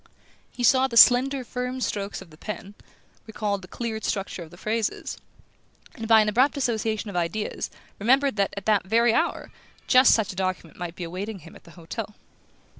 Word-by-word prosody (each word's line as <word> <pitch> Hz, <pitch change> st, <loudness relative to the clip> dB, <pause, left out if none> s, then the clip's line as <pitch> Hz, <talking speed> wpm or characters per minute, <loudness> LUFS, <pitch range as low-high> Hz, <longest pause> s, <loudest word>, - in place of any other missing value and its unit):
He 245 Hz, -, -6 dB
saw 260 Hz, +2 st, +5 dB
the 235 Hz, -3 st, -2 dB
slender 260 Hz, +3 st, +6 dB
firm 250 Hz, +1 st, -4 dB
strokes 200 Hz, -5 st, -3 dB
of 165 Hz, -, -20 dB
the -, -, -14 dB
pen, 200 Hz, +1 st, -7 dB, 0.5 s
recalled 210 Hz, -2 st, -2 dB
the 185 Hz, -, -12 dB
clear 225 Hz, +2 st, -4 dB
structure 195 Hz, -3 st, -3 dB
of 165 Hz, -, -9 dB
the 175 Hz, -, -15 dB
phrases, 220 Hz, +2 st, -3 dB, 0.7 s
and, 225 Hz, -, -7 dB
by 220 Hz, -1 st, +7 dB
an 215 Hz, -, +1 dB
abrupt 260 Hz, +7 st, +2 dB
association 220 Hz, -4 st, -1 dB
of -, -, -10 dB
ideas, 180 Hz, +5 st, -2 dB, 0.3 s
remembered 265 Hz, +5 st, +3 dB
that, 200 Hz, -1 st, +1 dB
at 200 Hz, -, -6 dB
that 210 Hz, -4 st, +2 dB
very 230 Hz, +2 st, +3 dB
hour, 335 Hz, +6 st, -1 dB, 0.3 s
just 255 Hz, 0 st, +6 dB
such 220 Hz, -4 st, -1 dB
a -, -, -15 dB
document 185 Hz, -3 st, -3 dB
might 175 Hz, -1 st, -5 dB
be 180 Hz, -, -6 dB
awaiting 190 Hz, +4 st, -5 dB
him 165 Hz, -, -13 dB
at -, -, -16 dB
the -, -, -14 dB
hotel. 205 Hz, +5 st, -7 dB
215 Hz, 190 wpm, -25 LUFS, 190-245 Hz, 0.7 s, by